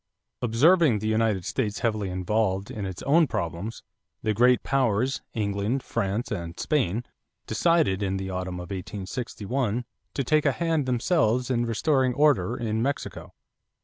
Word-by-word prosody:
Observing 135 - +4
the 105 - -5
United 110 -4 +1
States 105 +1 -2
heavily 110 -5 0
involved 95 +1 0
in 100 -3 -4
its 95 -2 -7
own 155 +3 +4
problems, 100 0 -4 0.4
the 110 -2 +1
great 125 +3 +4
powers, 130 -1 +1
England, 105 +4 -1
France, 100 +5 -2
and 85 -1 -5
Spain, 120 - 0 0.4
decided 165 - +2
in 95 -1 0
the 95 0 -4
autumn 90 0 -3
of 90 0 -7
1861 105 +5 -3 0.3
to 135 - 0
take 150 +3 +2
a 140 - +3
hand 160 -4 0
themselves 125 -1 +1
in 120 -1 +1
restoring 130 +2 +1
order 145 -5 +3
in 110 -3 -1
Mexico. 140 +4 -3
115 Hz, 145 wpm, -26 LUFS, 100-130 Hz, 0.4 s, Observing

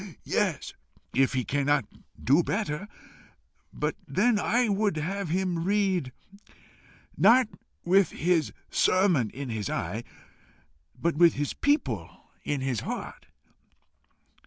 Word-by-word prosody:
"Yes, - - -1 0.4
if 135 0 +2
he 130 -1 -1
cannot 145 -3 +1 0.3
do 140 +7 +4
better. 200 -1 -2 0.8
But - - -2
then 240 -3 +2
I 240 +4 +2
would 205 -4 0
have 180 +3 -3
him 180 -1 -1
read 190 -7 +1 1.0
not 240 +4 +5 0.4
with 185 0 +4
his 165 -1 0 0.2
sermon 180 - +3
in 135 +2 -7
his 110 -3 -3
eye, 100 +7 -3 1.0
but 170 -2 0
with 170 -1 +6
his 145 0 -2
people 125 - -1
in 145 -2 -2
his 130 -4 -1
heart. - - -6
170 Hz, 110 wpm, -27 LUFS, 135-200 Hz, 1.0 s, with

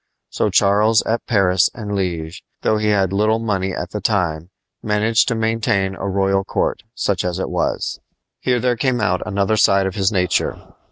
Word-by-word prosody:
So - - 0
Charles 105 +2 +3
at 115 +1 -2
Paris 95 -5 +3
and 105 -3 -5
Liege, 90 -3 -3 0.2
though 110 - +2
he 105 0 -1
had 100 -3 +2
little 110 +2 +2
money 100 -4 -1
at 90 0 -5
the 105 - -4
time, 85 -6 -1 0.3
managed 110 +2 +2
to 125 - 0
maintain 110 -3 0
a 100 - -5
royal 95 0 +1
court, - - -2
such 100 -3 -1
as 90 -1 -2
it 95 - -3
was. - - -2 0.4
Here 125 -1 +1
there 125 0 +1
came 125 +1 0
out 90 -4 0
another 100 +1 0
side 95 -1 +4
of 95 - -2
his 95 +1 +1
nature. 90 -4 0
100 Hz, 180 wpm, -19 LUFS, 95-110 Hz, 0.4 s, side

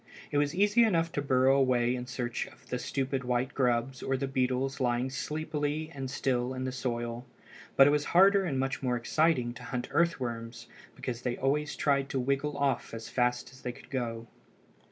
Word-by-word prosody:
It 145 - +2
was 145 +1 0
easy 205 +5 +4
enough 165 -6 +2
to 145 - -1
burrow 135 -1 +4
away 125 -2 +3
in 125 0 -4
search 125 -1 -3
of - - -18
the 125 - -2
stupid 135 +1 -2
white 125 +1 -1
grubs 125 0 0
or 135 - 0
the 135 - -2
beetles 135 +1 0
lying 125 0 0
sleepy 155 +1 -3
and 135 -1 -5
still 130 -1 -1
in 130 - -3
the 130 - -2
soil; 120 -2 -3 0.5
but 135 - +8
it 145 - +5
was 150 0 +1
harder 195 +2 +5
and 140 -8 -1
much 135 0 -1
more 125 -2 0
exciting 125 -1 +1
to 125 - -11
hunt 125 0 -4
earthworms, 115 -8 -1 0.3
because 125 -2 -5
they 125 -1 -2
always 150 +3 0
tried 140 -1 +1
to 135 - -1
wriggle 140 +3 -1
off 140 -4 0
as 115 0 -7
fast 125 0 0
as 130 - -16
they 125 - -3
could - - -16
go. 115 -3 -3
130 Hz, 195 wpm, -30 LUFS, 125-145 Hz, 0.5 s, but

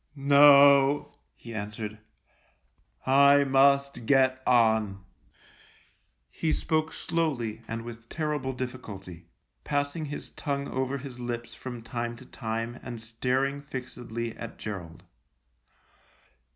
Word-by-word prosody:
" - - -40
No," 140 0 +6 0.2
he 115 - -10
answered; 105 0 -5 0.6
" - - -38 0.3
I 145 0 +6
must 140 -2 +3
get 130 -1 +3
on." 110 -5 +3 1.3
He 160 - -1
spoke 155 -1 0
slowly 135 -10 -2
and 115 0 -4
with 115 -1 -10
terrible 150 -4 -2
difficulty, 100 -9 -7 0.4
passing 145 +2 -1
his 145 0 -7
tongue 140 -2 -3
over 130 +1 -2
his 130 -2 -9
lips 120 -1 -4
from 120 0 -8
time 120 0 -4
to 130 - -14
time 115 0 -4
and 120 - -7
staring 130 +5 -1
fixedly 120 -4 -6
at 115 - -8
Gerald. 90 -6 -7
125 Hz, 110 wpm, -28 LUFS, 115-140 Hz, 1.3 s, No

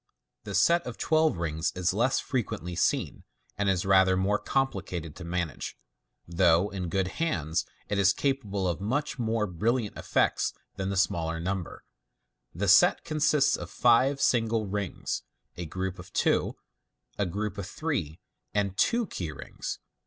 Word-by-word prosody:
The 100 -2 -4
set 170 +13 +4
of - - -6
twelve 160 - +2
rings 80 -1 -1
is 90 0 +1
less 120 +6 +2
frequently 95 - -3
seen, 85 - 0 0.3
and 100 0 0
is 95 -2 +1
rather 95 -1 +5
more 100 +3 +1
complicated 90 - -2
to 95 - -8
manage, 85 -3 -3 0.5
though 85 +2 +3
in 90 -3 -4
good 95 +2 0
hands 85 - -1 0.2
it 100 0 -1
is 100 -1 +5
capable 105 -6 -1
of 85 +1 -2
much 135 +7 -1
more 115 -2 0
brilliant 105 +5 -1
effects - - +1 0.2
than 95 0 -3
the 100 - -2
smaller 85 -3 +1
number. 95 +1 -4 0.7
The 100 +5 -2
set 100 - +6
consists 150 -3 +3
of 85 - -7
fi 120 +6 +4
e - - -4
single 115 -5 +1
rings, 100 -2 -3 0.3
a 85 -1 -5
group 95 +3 -4
of 90 - -11
two, - - +1 0.6
a 100 - +1
group 100 +2 -3
of 95 - -4
three, 100 - -3 0.4
and 100 -2 0
two 235 - +2
key 90 - -5
rings. - - -6
100 Hz, 155 wpm, -28 LUFS, 90-115 Hz, 0.7 s, set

